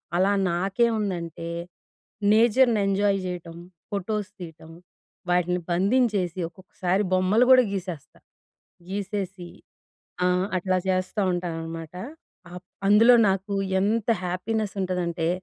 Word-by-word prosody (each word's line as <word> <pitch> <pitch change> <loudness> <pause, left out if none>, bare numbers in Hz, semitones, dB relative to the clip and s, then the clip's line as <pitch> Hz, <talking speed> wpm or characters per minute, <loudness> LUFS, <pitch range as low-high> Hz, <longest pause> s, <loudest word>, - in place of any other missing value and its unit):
అలా 190 +3 +3 0.2
నాకేం 195 +7 +1
ఉందంటే, 170 -4 -4 0.9
నేచర్‍ని 235 0 +4
ఎంజాయ్ 195 0 +2
చేయటం. 170 -2 -6 0.3
ఫోటోస్ 205 +1 -3
తీయటం. 165 -2 -10 0.6
వాటిని 180 0 +1
బంధించేసి, 195 -2 +1
ఒక్కొక్కసారి 185 +2 -2
బొమ్మలు 185 +6 +3
కూడా 255 -1 +8
గీసేస్తా. 180 -6 -6 0.7
గీసేసి 195 -2 -4 0.8
ఆహ్, 180 +1 +1
అట్లా 185 0 0
చేస్తా 185 +3 0
ఉంటాననమాట. 165 -2 -5 0.6
అప్ 180 0 -10 0.2
అందులో 225 +4 +7
నాకు 195 +1 -1 0.3
ఎంత 220 +3 0 0.2
హ్యాపీనెస్ 200 +4 -2
ఉంటదంటే, 175 -3 -1
185 Hz, 95 wpm, -25 LUFS, 175-205 Hz, 0.9 s, కూడా